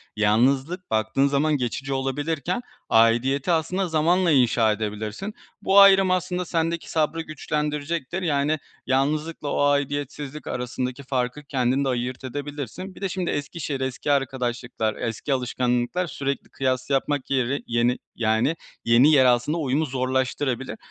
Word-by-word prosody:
Yalnızlık, 130 - +1
baktığın 110 +5 +2
zaman 145 +2 +2
geçici 135 +2 -3
olabilirken 145 - -2 0.3
aidiyeti 120 +7 +3
aslında 175 +3 0
zamanla 170 +2 +2
inşa 120 -4 +4
edebilirsin. 110 - -4 0.3
Bu 200 0 +5
ayrım 195 -1 +7
aslında 180 0 -1
sendeki 165 0 -2
sabrı 160 +1 0
güçlendirecektir, 150 +2 -3
yani, 150 -1 +1 0.3
yalnızlıkla 150 +4 0
o 145 - 0
aidiyetsizlik 145 0 -2
arasındaki 125 +2 -3
farkı 130 +2 -2
kendin 135 0 0
de - - +1
ayırt 125 +1 -3
edebilirsin. 145 - -6
Bir - - -13
de 195 - -1
şimdi 185 -1 -2
eski 145 +4 -4
şehir, 140 -3 -3
eski 130 +3 -2
arkadaşlıklar, 125 -4 -1
eski 115 +5 -2
alışkanlıklar 125 +6 0
sürekli 140 -1 -4
kıyas 130 -1 -1
yapmak 140 0 0
yeri 135 +1 0
yeni, 120 +1 +1 0.2
yani, 115 +7 +1 0.3
yeni 120 +6 +6
yer 135 -3 +6
aslında 125 +6 +2
uyumu 150 +1 0
zorlaştırabilir. 130 - -1
140 Hz, 130 wpm, -24 LUFS, 125-155 Hz, 0.3 s, ayrım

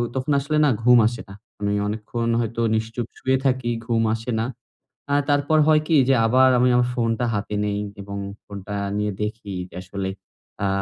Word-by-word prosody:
তখন 130 +3 -1
আসলে 140 +2 -1
না - - +4
ঘুম 125 +1 +7
আসে 120 +1 -4
না। - - -9 0.3
আমি 100 0 0
অনেকক্ষণ 110 +2 -3
হয়তো 115 +1 -3
নিশ্চুপ 110 +1 -3
শুয়ে 130 0 +1
থাকি, 130 -2 +1
ঘুম 115 -1 +1
আসে 115 +2 -4
না। 110 - 0 0.7
আ - - +2 0.2
তারপর 145 +2 +2
হয় 155 -1 +5
কি? 165 - +3
যে, 135 - +4
আবার 130 +3 +5
আমি 125 +1 +4
আমার 125 0 +3
ফোনটা 115 0 0
হাতে 105 0 -3
নেই, 105 0 -1 0.2
এবং 100 0 -7 0.3
ফোনটা 100 0 -7 0.2
নিয়ে 105 0 0
দেখি 105 -1 -5 0.2
যে, - - -15
আসলে। 95 +1 -4 0.6
আ - - +2
115 Hz, 185 wpm, -23 LUFS, 105-130 Hz, 0.7 s, ঘুম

